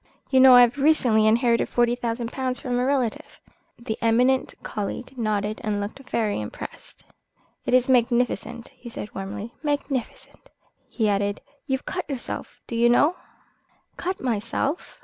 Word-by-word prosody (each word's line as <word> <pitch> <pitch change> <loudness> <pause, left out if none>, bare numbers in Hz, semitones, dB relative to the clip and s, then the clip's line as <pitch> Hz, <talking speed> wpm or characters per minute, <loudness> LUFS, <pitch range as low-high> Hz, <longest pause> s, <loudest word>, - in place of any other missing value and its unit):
You 265 - +5
know 260 -1 +9
I 245 - +9
have 245 +3 +3
recently 250 -7 +4
inherited 230 +1 +3
forty 240 0 +2
thousand 235 -1 -3
pounds 255 -1 -2
from 245 -2 -2
a - - +1
relative?" 260 -5 -1 0.4
The 225 -2 -5
eminent 250 +3 +2
colleague 230 +5 -5
nodded 215 -3 -1
and 210 -1 -1
looked 205 +6 -5
very 210 - 0
impressed. 105 - -9 0.6
"It 250 - +3
is 255 -1 +3
magnificent," 240 -1 +1
he 250 -2 -12
said 210 -2 -8
warmly, 200 +4 -6
"magnificent." 290 - -4 0.4
He 220 -3 0
added: 205 0 0 0.3
"You've 265 -1 -2
cut 365 -3 -4
yourself, 265 -4 -6
do 235 - -6
you 235 +1 +4
know?" 295 +8 +4 0.8
"Cut 370 +2 -3
myself?" 245 - -2
240 Hz, 150 wpm, -24 LUFS, 220-260 Hz, 0.8 s, know